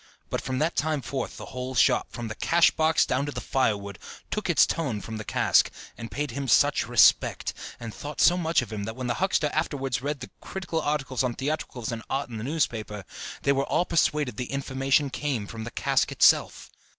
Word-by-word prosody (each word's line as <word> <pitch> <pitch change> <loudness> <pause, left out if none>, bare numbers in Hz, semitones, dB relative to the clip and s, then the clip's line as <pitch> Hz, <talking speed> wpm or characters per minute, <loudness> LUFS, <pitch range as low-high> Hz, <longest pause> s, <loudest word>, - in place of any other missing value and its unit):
But - - -1
from 130 - -3
that 155 +5 0
time 150 -3 0
forth 135 -3 -4
the - - -7
whole 130 +1 -4
shop, - - +3
from 120 -1 -6
the 110 - -4
cash 170 +8 +4
box 160 0 +3
down 140 +3 0
to - - -3
the 125 - -5
firewood, 105 -7 -1 0.3
took 215 -3 -2
its 155 -8 +6
tone 140 -10 -2
from 110 +3 -7
the 110 - -5
cask, - - +3 0.3
and 115 - -7
paid 145 -2 -3
him 140 +3 -4
such 115 - +4
respect, - - +4 0.3
and 115 -3 -7
thought 145 0 -7
so 175 +5 +6
much 165 -6 +1
of 115 - -9
him, 100 -1 -3
that 110 +1 -5
when 130 0 -5
the 120 - 0
huckster 170 -6 +1
afterwards 135 -6 -1
read 145 0 -3
the 125 - -8
critical 175 -4 -3
articles 135 -4 -1
on 125 -2 -1
theatricals 135 -5 -3
and 115 -1 -4
art 135 -2 -2
in 110 - -5
the - - -5
newspaper, 110 - -2 0.4
they 140 - +3
were 140 0 +1
all 175 - +1
persuaded 150 - +1
the 125 - -4
information 135 +1 +1
came 135 -8 -2
from 110 +1 -7
the - - -5
cask - - +1
itself. - - +3
135 Hz, 210 wpm, -26 LUFS, 120-150 Hz, 0.4 s, its